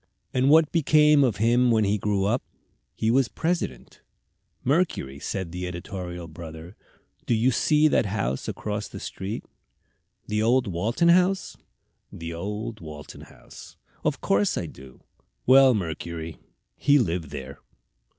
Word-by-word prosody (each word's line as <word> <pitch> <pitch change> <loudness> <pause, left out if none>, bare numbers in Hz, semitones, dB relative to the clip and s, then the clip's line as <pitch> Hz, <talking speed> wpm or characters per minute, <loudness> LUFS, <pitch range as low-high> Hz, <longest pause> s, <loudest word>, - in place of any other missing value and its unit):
"And 130 +2 +2
what 155 0 +5
became 150 -2 +5
of 120 -6 +2
him 120 +3 +3
when 110 -2 +3
he 105 +1 +1
grew 100 -1 0
up?" 120 +6 +1 0.5
"He 110 - +1
was 130 0 +3
President." 160 - -3 0.6
"Mercury," 135 - 0
said 95 +2 -4
the 90 +1 -4
editorial 90 -1 -6
brother, 80 +2 -10 0.5
"do 120 - +3
you 120 +4 +3
see 150 +5 +3
that 125 - +2
house 65 - -2
across 105 0 -4
the - - -9
street?" 95 +4 -6 0.8
"The 105 0 -1
old 120 +3 +3
Walton 110 - +1
House?" 185 +2 +3 0.6
"The 85 0 -7
old 105 +6 -5
Walton 75 -3 -10
House." - - -14 0.3
"Of - - -1
course 100 +1 +1
I - - -2
do." 65 -1 -13 0.4
"Well, 130 -1 +7
Mercury, 85 -3 -5 0.4
he 145 0 +4
lived 85 - -1
there." 70 -2 -8
105 Hz, 140 wpm, -25 LUFS, 85-130 Hz, 0.8 s, Well